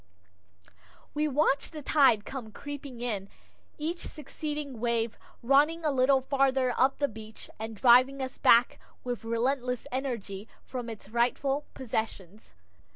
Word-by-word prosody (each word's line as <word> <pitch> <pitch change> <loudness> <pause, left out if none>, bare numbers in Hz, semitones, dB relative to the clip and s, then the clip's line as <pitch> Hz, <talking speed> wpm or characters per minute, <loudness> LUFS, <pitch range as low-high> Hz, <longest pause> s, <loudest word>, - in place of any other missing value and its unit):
We 300 +1 +1
watch 290 0 +1
the 305 -3 -8
tide 270 -8 +4
come 245 -5 -7
creeping 280 0 -8
in, 205 -5 -3 0.5
each 330 +3 -3
succeeding 295 -3 -6
wave 235 -1 0 0.3
running 295 +6 +3
a 300 - +3
little 265 0 +4
farther 265 -1 +2
up 265 +1 +3
the 285 - +1
beach 220 -2 -11
and 220 0 -5
driving 255 +4 +5
us 260 -1 -5
back 235 +1 +5 0.2
with 245 -2 -4
relentless 250 +2 -1
energy 230 -6 -4 0.2
from 245 -2 -6
its 220 -3 -9
rightful 260 +5 0
possessions. 220 -5 -4
255 Hz, 130 wpm, -29 LUFS, 230-280 Hz, 0.5 s, driving